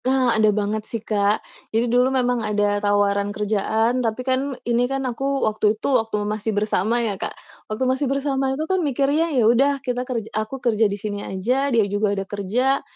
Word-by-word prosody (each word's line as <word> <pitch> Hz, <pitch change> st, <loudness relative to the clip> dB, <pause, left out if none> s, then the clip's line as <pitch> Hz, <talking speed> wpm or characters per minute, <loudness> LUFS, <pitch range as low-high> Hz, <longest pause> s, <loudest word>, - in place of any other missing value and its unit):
Ah, 260 Hz, -2 st, +3 dB
ada 215 Hz, -1 st, +4 dB
banget 210 Hz, +1 st, 0 dB
sih, 230 Hz, -, -2 dB
Kak. 210 Hz, -1 st, 0 dB, 0.2 s
Jadi 225 Hz, +2 st, +1 dB
dulu 250 Hz, +1 st, +4 dB
memang 250 Hz, -2 st, +1 dB
ada 205 Hz, -1 st, 0 dB
tawaran 205 Hz, 0 st, +2 dB
kerjaan, 215 Hz, +4 st, 0 dB
tapi 235 Hz, +1 st, -2 dB
kan 265 Hz, 0 st, 0 dB
ini 240 Hz, +1 st, +1 dB
kan 270 Hz, 0 st, -2 dB
aku 270 Hz, +3 st, -1 dB
waktu 215 Hz, 0 st, +1 dB
itu 275 Hz, -, -1 dB, 0.3 s
masih 215 Hz, 0 st, -2 dB
bersama 215 Hz, +2 st, +1 dB
ya, 200 Hz, -3 st, -3 dB
Kak. -, -, -1 dB, 0.4 s
Waktu 215 Hz, +5 st, -1 dB
masih 260 Hz, +2 st, +1 dB
bersama 275 Hz, -1 st, 0 dB
itu 275 Hz, +4 st, -2 dB
kan 375 Hz, +2 st, 0 dB
mikir, 280 Hz, -3 st, 0 dB
ya 325 Hz, +2 st, +2 dB, 0.2 s
udah 270 Hz, +5 st, +4 dB
kita 250 Hz, -1 st, -1 dB
kerja 230 Hz, -4 st, -2 dB
aku 215 Hz, +5 st, -3 dB
kerja 225 Hz, -4 st, +2 dB
di 200 Hz, -, -3 dB
sini 205 Hz, 0 st, -4 dB
aja, 250 Hz, +10 st, -1 dB
dia 230 Hz, -5 st, +3 dB
juga 205 Hz, 0 st, 0 dB
ada 195 Hz, -, -2 dB
kerja. 215 Hz, +8 st, 0 dB
225 Hz, 190 wpm, -22 LUFS, 210-260 Hz, 0.4 s, ada